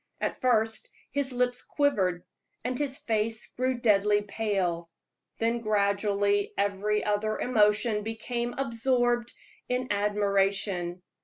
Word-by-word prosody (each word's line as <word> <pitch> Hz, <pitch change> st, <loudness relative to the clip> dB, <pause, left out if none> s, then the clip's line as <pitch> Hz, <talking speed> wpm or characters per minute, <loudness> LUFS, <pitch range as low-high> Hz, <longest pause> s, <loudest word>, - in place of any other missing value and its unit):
At -, -, -3 dB
first 225 Hz, -3 st, +1 dB, 0.2 s
his 280 Hz, -1 st, +1 dB
lips 245 Hz, 0 st, 0 dB
quivered, 190 Hz, -, 0 dB, 0.4 s
and 250 Hz, +1 st, -1 dB
his 280 Hz, -2 st, -1 dB
face 225 Hz, -4 st, -1 dB
grew 255 Hz, +1 st, 0 dB
deadly 210 Hz, -2 st, +3 dB
pale; 195 Hz, -5 st, -1 dB, 0.5 s
then 230 Hz, +1 st, 0 dB
gradually 205 Hz, -1 st, +1 dB
every 205 Hz, +1 st, 0 dB
other 210 Hz, +1 st, 0 dB
emotion 210 Hz, -2 st, +2 dB
became 235 Hz, +2 st, -3 dB
absorbed 240 Hz, -1 st, +1 dB, 0.4 s
in 250 Hz, 0 st, -1 dB
admiration. 200 Hz, -3 st, 0 dB
215 Hz, 105 wpm, -28 LUFS, 200-240 Hz, 0.5 s, deadly